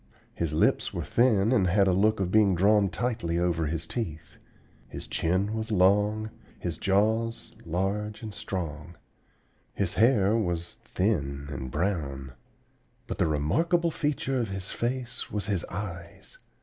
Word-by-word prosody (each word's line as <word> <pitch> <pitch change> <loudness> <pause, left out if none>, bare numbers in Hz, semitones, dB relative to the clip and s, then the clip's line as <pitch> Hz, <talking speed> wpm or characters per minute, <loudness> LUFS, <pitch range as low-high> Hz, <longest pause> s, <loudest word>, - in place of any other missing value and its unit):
His 85 -3 -2
lips 75 - +2
were - - -2
thin, 115 -3 +3
and 105 -8 +3
had 95 +2 +3
a 95 - +4
look 105 +3 +3
of 90 -2 -1
being 105 -3 +4
drawn 100 +2 +4
tightly 110 -6 -1
over 85 -2 +1
his 80 +2 -2
teeth. 80 -7 -5 0.5
His - - -7
chin 95 +5 0
was 110 0 -3
long, 105 +2 +3 0.3
his - - -4
jaws 110 +4 +1
large 100 +6 -2
and 110 -2 -6
strong. 85 -4 -5 0.8
His 95 -4 0
hair 110 -1 +4
was 85 -6 -2
thin 70 -8 -1
and 65 -2 -5
brown. 70 -5 -2 0.7
But - - -6
the - - +3
remarkable 165 - +1
feature 140 -3 -1
of 115 - -3
his 95 -1 -5
face 120 0 -3
was 105 -2 -3
his 100 -5 -1
eyes. 85 -3 -7
95 Hz, 145 wpm, -28 LUFS, 85-110 Hz, 0.8 s, a